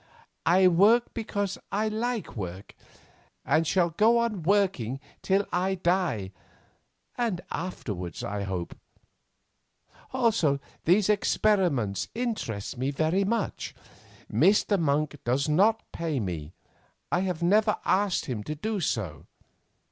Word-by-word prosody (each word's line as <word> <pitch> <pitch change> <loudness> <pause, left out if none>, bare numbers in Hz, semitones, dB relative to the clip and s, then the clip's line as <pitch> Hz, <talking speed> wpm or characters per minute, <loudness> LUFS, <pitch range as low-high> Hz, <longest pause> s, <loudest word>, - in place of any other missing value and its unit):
"I 185 +3 +6
work 205 +7 +4
because 205 -4 -3
I 215 +2 0
like 225 +1 -2
work, 95 -2 -6 0.7
and 155 +4 +2
shall 175 -1 +2
go 220 +7 +4
on 230 -5 0
working 170 - +1 0.2
till 195 +1 +2
I 185 +2 +1
die, 175 - 0 0.9
and 225 -7 0
afterwards 105 - -5
I 100 0 -3
hope; 95 -3 -4 1.4
also, 225 - +2 0.3
these 185 +4 +4
experiments 185 - +1
interest 210 - -3
me 130 +2 0
very 160 +7 +1
much. 220 +1 -2 0.5
Mr. 195 - +3
Monk 150 -1 0
does 130 +4 +1
not 200 +9 +3
pay 160 -5 -2
me. 85 -6 -5 0.6
I 175 - +2
have 180 -3 -2
never 210 +4 +3
asked 195 -1 +2
him 115 -6 -4
to 150 - -4
do 215 +7 -2
so. 95 - -3
175 Hz, 115 wpm, -27 LUFS, 130-205 Hz, 1.4 s, I